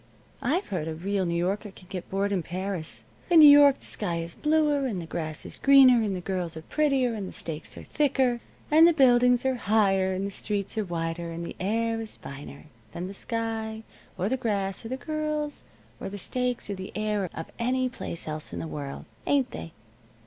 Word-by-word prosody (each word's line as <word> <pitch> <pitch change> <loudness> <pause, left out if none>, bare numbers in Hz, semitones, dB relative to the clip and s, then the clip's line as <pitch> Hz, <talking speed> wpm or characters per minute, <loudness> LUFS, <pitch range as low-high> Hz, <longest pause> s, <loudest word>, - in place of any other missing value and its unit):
"I've 330 +10 0
heard 175 -5 -2
a 160 - -3
real 190 +2 -1
New 170 0 0
Yorker 195 +5 -1
can 190 -1 -15
get 185 -1 -6
bored 200 +1 0
in 190 -3 +1
Paris. 180 -1 -4 0.3
In 340 -2 +7
New 305 - +11
York 280 -1 +6
the - - -9
sky 180 -5 -2
is 165 0 -4
bluer, 300 -3 +2
and 205 -7 -3
the 170 - -5
grass 155 -1 -5
is - - -6
greener, 265 -3 +7
and 205 -3 -1
the 180 - -4
girls 180 -3 -3
are 160 - -8
prettier, 275 - +1
and 205 -4 -4
the - - -7
steaks 160 -1 -7
are - - -8
thicker, 265 -5 +1 0.3
and 320 +2 +8
the 340 - +5
buildings 250 -3 +5
are 265 - +3
higher, 195 -5 +2
and 190 +1 -2
the 200 - -3
streets 200 0 -3
are 220 - 0
wider, 170 -1 -3
and 165 +1 -5
the - - -7
air 225 +4 0
is 220 - -5
finer, 140 +1 -10 0.3
than 175 - -4
the 190 - -6
sky, 225 0 -3 0.3
or 185 +1 0
the 260 +4 0
grass, 200 -6 -2
or - - -6
the 260 - -3
girls, 305 0 -3 0.4
or - - -5
the 205 - -6
steaks, 250 +5 -2
or 205 - -3
the 190 -1 -7
air 210 -3 -1
of 165 - -6
any 255 +2 +1
place 245 -10 -6
else 155 0 -4
in - - -5
the - - -4
world. 140 -3 -6 0.2
Ain't 275 -3 +2
they?" 165 - -7
205 Hz, 215 wpm, -27 LUFS, 180-255 Hz, 0.4 s, New